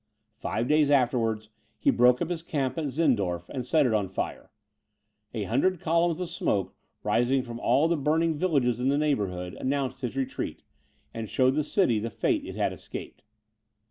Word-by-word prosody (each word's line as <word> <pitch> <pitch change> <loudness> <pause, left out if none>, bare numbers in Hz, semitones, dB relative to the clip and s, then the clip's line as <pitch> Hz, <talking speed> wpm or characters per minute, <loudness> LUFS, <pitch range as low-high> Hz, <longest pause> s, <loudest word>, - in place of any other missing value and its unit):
Five 115 +2 -2
days 150 0 +4
afterwards, 120 -5 +1 0.3
he - - +3
broke 125 +3 +4
up 170 - -4
his 170 -2 -2
camp 135 -6 -2
at 155 - -1
Zirndorf, 105 - 0
and 130 - -4
set 150 +4 +3
it 120 - +2
on 105 -3 +1
fire. 95 - -5 0.9
A 110 - -1
hundred 140 - +1
columns 170 +1 +1
of 180 -1 -4
smoke, 100 - -1 0.3
rising 125 +2 +2
from 120 -2 -7
all 145 +5 +3
the 170 0 +1
burning 160 +3 +2
villages 140 -8 +1
in 130 +2 +1
the 140 - +2
neighbourhood, 100 -12 -1
announced 135 -1 -2
his 125 -1 -3
retreat, 135 -1 -3 0.5
and 115 -2 -5
showed 130 0 +3
the 150 +2 +1
city 135 - +2
the 115 +2 -3
fate - - 0
it - - -7
had - - 0
escaped. - - -8
130 Hz, 175 wpm, -27 LUFS, 115-155 Hz, 0.9 s, days